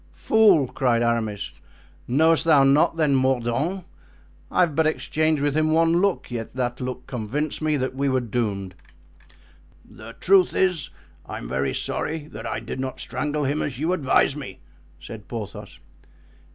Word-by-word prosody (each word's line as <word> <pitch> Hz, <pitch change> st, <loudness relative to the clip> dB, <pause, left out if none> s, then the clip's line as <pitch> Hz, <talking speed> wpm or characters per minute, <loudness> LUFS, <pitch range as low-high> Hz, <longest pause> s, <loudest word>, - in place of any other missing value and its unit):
"Fool!" 205 Hz, -10 st, +4 dB
cried 120 Hz, -2 st, 0 dB
Aramis; 115 Hz, -3 st, -1 dB, 0.6 s
"knowest 160 Hz, +6 st, +3 dB
thou 150 Hz, -4 st, +5 dB
not, 140 Hz, +4 st, +3 dB
then, 150 Hz, -3 st, +2 dB
Mordaunt? 130 Hz, +7 st, 0 dB, 0.6 s
I -, -, +2 dB
have 165 Hz, -5 st, +2 dB
but 160 Hz, 0 st, +3 dB
exchanged 155 Hz, -1 st, 0 dB
with 145 Hz, -1 st, 0 dB
him 155 Hz, 0 st, +2 dB
one 165 Hz, +2 st, +3 dB
look, 200 Hz, -9 st, 0 dB
yet 115 Hz, 0 st, -5 dB
that 125 Hz, -1 st, -2 dB
look 125 Hz, 0 st, -5 dB
convinced 130 Hz, +7 st, -3 dB
me 155 Hz, -1 st, +1 dB
that 130 Hz, -1 st, -2 dB
we 140 Hz, +1 st, 0 dB
were 130 Hz, -1 st, +2 dB
doomed." 105 Hz, -5 st, -3 dB, 1.1 s
"The 115 Hz, +1 st, -12 dB
truth 185 Hz, +4 st, +3 dB
is, 180 Hz, -6 st, +1 dB, 0.4 s
I'm -, -, -6 dB
very 65 Hz, +2 st, -1 dB
sorry 160 Hz, -1 st, -3 dB
that -, -, -7 dB
I -, -, -3 dB
did -, -, -7 dB
not 130 Hz, 0 st, -4 dB
strangle 150 Hz, 0 st, -3 dB
him 145 Hz, +2 st, 0 dB
as 130 Hz, -4 st, -3 dB
you 160 Hz, +6 st, 0 dB
advised 140 Hz, -3 st, +2 dB
me," 100 Hz, -10 st, -8 dB, 0.4 s
said 105 Hz, +5 st, -10 dB
Porthos. 110 Hz, -4 st, -7 dB
135 Hz, 155 wpm, -23 LUFS, 120-155 Hz, 1.1 s, thou